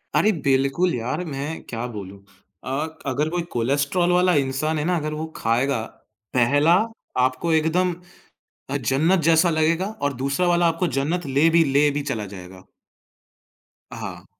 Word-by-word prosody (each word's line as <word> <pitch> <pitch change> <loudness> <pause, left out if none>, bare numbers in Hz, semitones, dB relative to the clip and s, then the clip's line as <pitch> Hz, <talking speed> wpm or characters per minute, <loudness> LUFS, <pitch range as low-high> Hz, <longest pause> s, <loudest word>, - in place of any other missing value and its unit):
अरे, 215 - +4
बिल्कुल 140 +2 +1
यार 125 +9 -3
मैं 150 +1 -5
क्या 115 0 -4
बोलूँ? 100 -4 -8 0.5
अ, 140 +4 -2
क 160 - -15
अगर 145 +4 0
कोई 175 +1 -1
कोलेस्ट्रोल 145 +9 +1
वाला 180 0 +3
इंसान 145 +3 0
है 150 - -2
ना 180 +1 +1
अगर 155 -1 -3
वो 155 +1 -4
खाएगा, 120 +2 0 0.5
पहला 145 +7 +4 0.5
आपको 130 +6 -1
एकदम 170 +3 +2 0.8
अ, 140 - 0
जन्नत 145 +8 +2
जैसा 165 +1 +4
लगेगा 165 +3 +1 0.2
और 145 0 +1
दूसरा 140 +6 0
वाला 175 0 +3
आपको 165 +2 0
जन्नत 165 +4 -2
ले 140 +4 +3
भी 165 0 +4
ले 145 +1 +4
भी 145 0 -2
चला 105 -3 -4
जाएगा। 95 -1 -11 1.3
हाँ। - - -7
150 Hz, 155 wpm, -23 LUFS, 135-170 Hz, 1.3 s, अरे